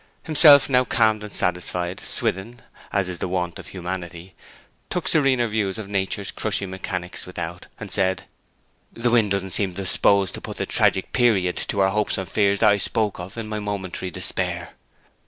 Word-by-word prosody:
Himself 150 -3 +7
now 125 -2 +3
calmed 110 -3 +2
and 105 - -8
satisfied, 90 0 -1
Swithin, 115 +6 -2 0.3
as 100 -2 0
is 90 -2 -5
the - - -2
wont 90 -2 -3
of - - -11
humanity, 90 -1 -6 0.6
took 180 - -2
serener 135 -6 +3
views 105 -3 -1
of 110 -3 -6
Nature's 100 0 -2
crushing 95 -2 -2
mechanics 90 -1 -4
without, 85 -1 -6
and 100 -3 -8
said, 95 -1 +1 0.7
'The 120 +1 0
wind 115 -3 +4
doesn't 95 -1 -2
seem 95 -2 -1
disposed 95 0 +2
to - - -7
put - - -7
the - - -2
tragic 95 - +1
period 105 -8 +2
to 100 - -2
our 95 - +4
hopes 105 +1 -1
and 95 -1 -4
fears 100 +2 +1
that 110 -2 +6
I 100 - +3
spoke 105 +1 -1
of 90 +5 -8
in 115 -1 -4
my 110 0 -3
momentary 95 -3 -4
despair.' 85 - -2
100 Hz, 175 wpm, -23 LUFS, 90-110 Hz, 0.7 s, Himself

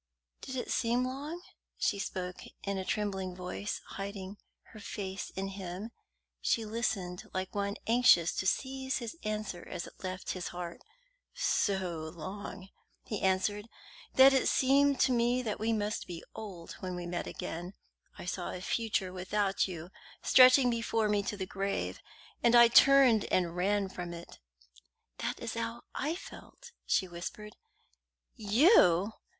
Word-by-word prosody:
"Did 260 - -6
it 250 - -3
seem 240 +1 +1
long?" 290 +7 -5 0.3
She 200 - 0
spoke 180 -1 -4 0.2
in 200 -1 -2
a - - -2
trembling 190 -3 -2
voice, 180 +3 -4
hiding 195 0 -6 0.3
her 215 - -11
face 195 -3 -5
in 195 0 -3
him. 195 +2 -6 0.5
She 225 - +1
listened 205 -5 -2
like 185 0 -3
one 200 0 -1
anxious 225 -8 +5
to 185 - 0
seize 265 +3 -1
his 235 +3 -5
answer 215 -4 -3
as 170 - -4
it - - -14
left 185 0 -4
his 180 -2 -4
heart. 175 -1 -6 0.5
"So 185 - 0
long," 190 +2 -7 0.3
he 210 - -4
answered, 205 +3 +1 0.5
"that 265 +1 +8
it 265 - +3
seemed 275 +1 +4
to - - +4
me 245 +1 +2 0.2
we 220 +2 0
must 210 -1 -1
be 170 -2 -7
old 190 -6 -8
when 185 -1 -4
we 175 0 -5
met 175 0 -3
again. 175 +4 -6 0.4
I - - -8
saw 180 0 -3
a - - -5
future 195 -1 -1
without 195 +2 0
you 175 -1 -7 0.3
stretching 255 0 +7
before 230 -2 0
me 205 -1 +2
to 205 +1 -4
the 190 - -3
grave, 195 +1 -3 0.4
and 235 0 +5
I 235 -1 +9
turned 260 -3 +7
and 175 -2 0
ran 200 +2 +1
from 175 -2 -6
it." 170 0 -11 0.8
"That - - -3
is 230 -1 -4
how 230 +1 -4
I 305 +4 -1
felt," 475 - -12 0.2
she 190 - +2
whispered. 180 +5 -7 0.8
"You!" 210 - +5
200 Hz, 150 wpm, -31 LUFS, 185-235 Hz, 0.8 s, I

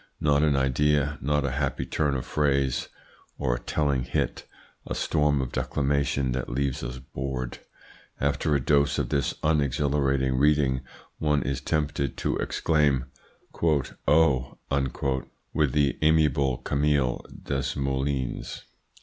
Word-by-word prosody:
Not 75 -1 +3
an 75 -2 +3
idea, 75 +2 +2
not 75 +1 +1
a 70 - -1
happy 70 0 -1
turn 75 -3 0
of 65 - -3
phrase, 70 -3 +1 0.5
or 65 - 0
a - - -2
telling 70 +2 0
hit: 60 +1 -2 0.4
a - - -3
storm 75 -2 +1
of 65 -2 -4
declamation 70 0 0
that 65 0 -3
leaves 70 +1 -1
us 60 +1 -5
bored. 65 -1 -5 0.6
After 70 +1 +1
a - - +3
dose 70 +2 +2
of - - -1
this 70 -3 0
unexhilarating 70 -3 +1
reading 70 -3 +3 0.4
one 75 -3 +2
is 70 -1 -2
attempted 70 -2 -1
to - - 0
exclaim 70 -5 +1 0.4
`Oh!' 70 -3 +1 0.3
with 75 -4 +2
the 70 -2 +2
amiable 75 -5 +3
Camille 70 -3 +1
Desmoulins." 65 -1 -2
70 Hz, 125 wpm, -26 LUFS, 65-75 Hz, 0.6 s, Not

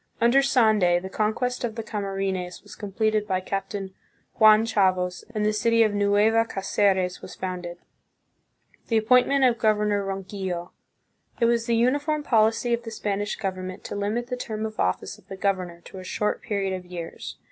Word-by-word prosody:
Under 235 +4 +5
Sande 215 -10 +3
the 190 +1 -8
conquest 240 +4 -1
of 230 -2 -2
the 225 - -4
Camarines 195 -4 -3
was - - -13
completed 215 +1 -1
by 185 -2 0
Captain 195 0 -4 0.5
Juan 215 0 +7
Chaves 185 -4 +1
and 210 0 0
the 215 - +2
city 230 +2 +3
of 215 -2 +1
Nueva 205 +2 +3
Cdceres 195 -3 0
was - - -9
founded. 180 -2 -5 1.1
The 225 - +2
Appointment 250 +5 +4
of 240 -3 +3
Governor 210 -2 +2
Ronquillo. 190 -2 -4 0.7
It 235 - +3
was 230 0 +1
the 235 - +2
uniform 290 +6 +1
policy 225 -1 +2
of 235 - 0
the 235 - -7
Spanish 205 -2 -2
government 185 -1 -5
to - - -6
limit 210 +4 -1
the 250 0 -4
term 220 -3 -4
of 215 0 -7
office 90 - -1
of - - -25
the 195 - -8
governor 185 -3 -2
to 190 - -11
a - - -8
short 210 +3 -2
period 200 -5 -2
of 185 -1 -5
years. 175 -2 -7
210 Hz, 170 wpm, -25 LUFS, 190-230 Hz, 1.1 s, Juan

